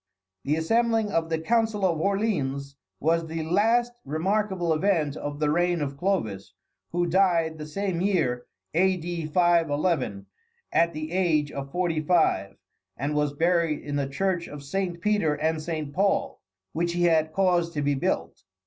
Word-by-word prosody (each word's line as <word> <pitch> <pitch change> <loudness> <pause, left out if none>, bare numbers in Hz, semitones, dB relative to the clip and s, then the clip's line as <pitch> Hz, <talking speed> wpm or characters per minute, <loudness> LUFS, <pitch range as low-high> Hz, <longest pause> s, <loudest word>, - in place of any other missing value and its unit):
The 145 +2 +2
assembling 225 +5 +1
of 165 -3 0
the 160 - 0
Council 220 +3 +1
of 170 -4 +1
Orleans 145 -9 -1 0.2
was 165 +2 +1
the 160 0 -3
last 225 +8 +2
remarkable 180 +3 0
event 155 -4 +1
of 145 -1 -5
the 150 -1 +1
reign 175 +1 +1
of 140 -2 -3
Clovis, 140 - -2 0.4
who 175 +1 +1
died 170 -3 +2
the 150 - -6
same 185 +1 -2
year, 155 -11 0 0.3
A.D. 175 -2 0
511, 160 - +1 0.5
at 170 -1 +3
the 155 +1 -5
age 165 -5 +1
of 140 0 -6
forty 170 -2 0
five, 155 - +1 0.4
and 140 +3 -2
was 150 -1 0
buried 165 -1 +1
in 145 -1 -4
the 140 -1 -1
church 175 +3 -1
of 145 -1 -9
Saint 175 +3 -3
Peter 205 -8 +2
and 155 +1 -1
Saint 155 -3 -4
Paul, 195 +4 0 0.3
which 170 +1 -1
he 175 0 0
had 160 -2 +3
caused 175 -2 +1
to 145 - -1
be 145 0 +2
built. 135 - -2
165 Hz, 160 wpm, -26 LUFS, 150-185 Hz, 0.5 s, at